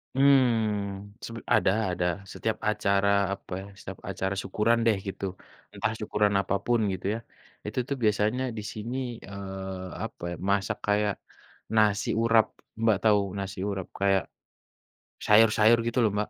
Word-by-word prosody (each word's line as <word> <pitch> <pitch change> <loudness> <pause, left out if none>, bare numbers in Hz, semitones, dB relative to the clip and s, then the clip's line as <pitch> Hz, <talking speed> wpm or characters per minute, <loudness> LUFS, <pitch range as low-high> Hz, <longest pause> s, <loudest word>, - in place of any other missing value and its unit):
Mmm, 110 -7 +2
sep 115 - -7 0.2
ada 95 - +3 0.2
ada, 90 - -1 0.3
setiap 110 - -2
acara, 100 -1 +2 0.2
apa 100 - -11
ya, - - -9
setiap - - -9
acara 95 +1 -2
syukuran 105 +4 +1
deh 110 -3 +4
gitu. 95 - -4 0.5
Entah 110 - -1
syukuran 105 -1 +1
apa 100 0 -1
pun 120 -1 +3
gitu 95 - -6
ya. 115 - -3 0.5
Itu - - -2
tuh 140 - -1
biasanya 110 +4 +2
di - - -3
sini, 115 +4 -5 0.3
eee, 95 -1 -6 0.2
apa 110 -5 -7
ya, - - -4
masak 100 -1 +1
kayak 105 0 +2 0.6
nasi 105 -2 +3
urap, 115 -1 +5 0.4
Mbak 110 -3 +4
tahu 105 -2 +5 0.2
nasi 95 -1 -5
urap? 95 -2 -4
Kayak 100 -1 +3 1.0
sayur-sayur 110 +1 +6
gitu 115 - -2
loh 110 - +3
Mbak. 105 - -1
105 Hz, 145 wpm, -27 LUFS, 100-115 Hz, 1.0 s, sayur-sayur